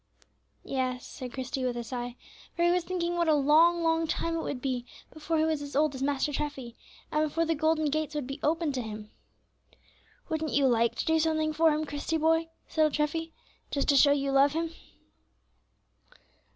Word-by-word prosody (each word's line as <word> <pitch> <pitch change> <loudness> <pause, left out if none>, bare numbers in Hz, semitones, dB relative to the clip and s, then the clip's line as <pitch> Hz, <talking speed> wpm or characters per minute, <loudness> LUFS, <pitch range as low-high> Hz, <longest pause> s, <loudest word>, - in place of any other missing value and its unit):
"Yes," 255 -2 -2
said 255 -2 -8
Christie, 260 0 -4
with 245 -1 -1
a 240 - -3
sigh, 245 0 -5 0.4
for 340 - 0
he 345 - +4
was 360 0 +1
thinking 345 -1 -2
what 340 -1 +1
a 310 - +5
long, 320 +4 +4
long 325 0 +2
time 330 +1 -1
it 330 - -1
would 270 - -4
be 250 -2 -2 0.3
before 315 +1 -2
he 310 - +3
was 315 -2 0
as 285 -1 -7
old 300 0 +2
as 265 - -7
Master 285 +1 0
Treffy, 270 -5 -4 0.4
and 305 0 +1
before 330 +3 0
the 330 - +1
golden 315 -1 +1
gates 310 0 -2
would 295 -3 -2
be 275 +3 -6
opened 320 -1 0
to 255 - -2
him. 215 -1 -8 1.2
"Wouldn't 315 -1 -2
you 280 -1 +3
like 235 -2 +2
to - - -3
do 320 0 +3
something 315 -1 +1
for 325 +1 +4
Him, 305 +1 -1
Christie, 290 +2 -2
boy," 325 +1 +2 0.2
said 315 - +1
old 305 - 0
Treffy, 325 +2 -1 0.4
"just 280 - -1
to 285 - +5
show 285 +1 +6
you 275 -1 +1
love 275 +1 +4
Him?" 325 0 -2
300 Hz, 200 wpm, -29 LUFS, 270-325 Hz, 1.2 s, show